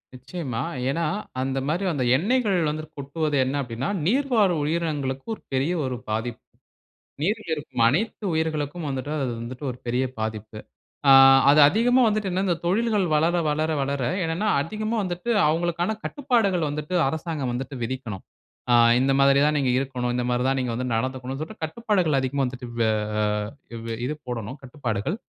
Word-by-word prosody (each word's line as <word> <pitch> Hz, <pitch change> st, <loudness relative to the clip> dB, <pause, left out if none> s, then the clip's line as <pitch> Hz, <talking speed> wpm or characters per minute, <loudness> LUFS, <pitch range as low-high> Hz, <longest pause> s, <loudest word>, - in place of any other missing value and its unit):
நிச்சயமா. 130 Hz, -2 st, -5 dB, 0.3 s
ஏனா, 165 Hz, +5 st, -1 dB, 0.4 s
அந்த 135 Hz, 0 st, -2 dB
மாதிரி 175 Hz, +6 st, 0 dB
அந்த 135 Hz, -4 st, -1 dB
எண்ணெய்கள் 210 Hz, -, +1 dB
வந்து 155 Hz, +1 st, -3 dB
கொட்டுவது 145 Hz, +2 st, -2 dB
என்ன 130 Hz, +2 st, -2 dB
அப்படினா, 120 Hz, 0 st, -4 dB, 0.2 s
நீர்வாழ் 235 Hz, -5 st, +3 dB
உயிரினங்களுக்கு 145 Hz, -4 st, -2 dB
ஒரு -, -, -22 dB
பெரிய 135 Hz, +7 st, +1 dB
ஒரு 130 Hz, -, -2 dB
பாதிப்பு. 110 Hz, +2 st, -3 dB, 0.8 s
நீரில் 210 Hz, +2 st, -1 dB
இருக்கும் 135 Hz, -5 st, -2 dB
அனைத்து 210 Hz, -, 0 dB
உயிர்களுக்கும் 160 Hz, 0 st, -2 dB
வந்துட்டு 135 Hz, +1 st, -3 dB
அது 125 Hz, -, -1 dB
வந்துட்டு 125 Hz, +4 st, -7 dB
ஒரு 125 Hz, -, -10 dB
பெரிய 125 Hz, +2 st, 0 dB, 0.2 s
பாதிப்பு. 110 Hz, -1 st, -4 dB, 0.5 s
ஆ -, -, +9 dB, 0.4 s
அது 150 Hz, -, +6 dB
அதிகமா 245 Hz, +7 st, +3 dB
வந்துட்டு, 215 Hz, -2 st, 0 dB
என்ன 185 Hz, +2 st, 0 dB
இந்த 175 Hz, -, +2 dB
தொழில்கள் 210 Hz, +2 st, +2 dB
வளர, 165 Hz, +3 st, +2 dB
வளர, 155 Hz, +2 st, 0 dB
வளர 140 Hz, -1 st, -1 dB, 0.2 s
என்னன்னா, 165 Hz, +6 st, -1 dB
அதிகமா 215 Hz, +7 st, -3 dB
வந்துட்டு 180 Hz, +4 st, -4 dB, 0.2 s
அவங்களுக்கான 175 Hz, +5 st, 0 dB
கட்டுப்பாடுகள் 225 Hz, -, +1 dB
வந்துட்டு, 150 Hz, +4 st, -4 dB
அரசாங்கம் 155 Hz, -3 st, -3 dB
வந்துட்டு 135 Hz, +3 st, -5 dB
விதிக்கனும். 115 Hz, -5 st, -5 dB, 0.5 s
ஆ, -, -, +6 dB, 0.2 s
இந்த 135 Hz, +1 st, +2 dB
மாதிரி 140 Hz, 0 st, +5 dB
தான் 150 Hz, 0 st, +2 dB
நீங்க 135 Hz, -3 st, +1 dB
இருக்கனும், 125 Hz, -2 st, -2 dB
இந்த 125 Hz, -, 0 dB
மாதிரி 125 Hz, 0 st, +1 dB
தான் 135 Hz, -, +1 dB
நீங்க 125 Hz, -2 st, -1 dB
வந்து 125 Hz, +2 st, -2 dB
நடந்துக்கனும். 130 Hz, +2 st, -3 dB
சொல்லிட்டு 160 Hz, +3 st, -7 dB
கட்டுப்பாடுகள் 180 Hz, -3 st, 0 dB
அதிகமா 135 Hz, +1 st, -1 dB
வந்துட்டு 125 Hz, 0 st, -6 dB
வே 115 Hz, -, +3 dB, 1.0 s
வே 115 Hz, -, -3 dB
இது 145 Hz, -, -1 dB
போடணும் 120 Hz, +1 st, -5 dB
கட்டுப்பாடுகள். 125 Hz, -, -3 dB
145 Hz, 155 wpm, -24 LUFS, 130-175 Hz, 1.0 s, ஆ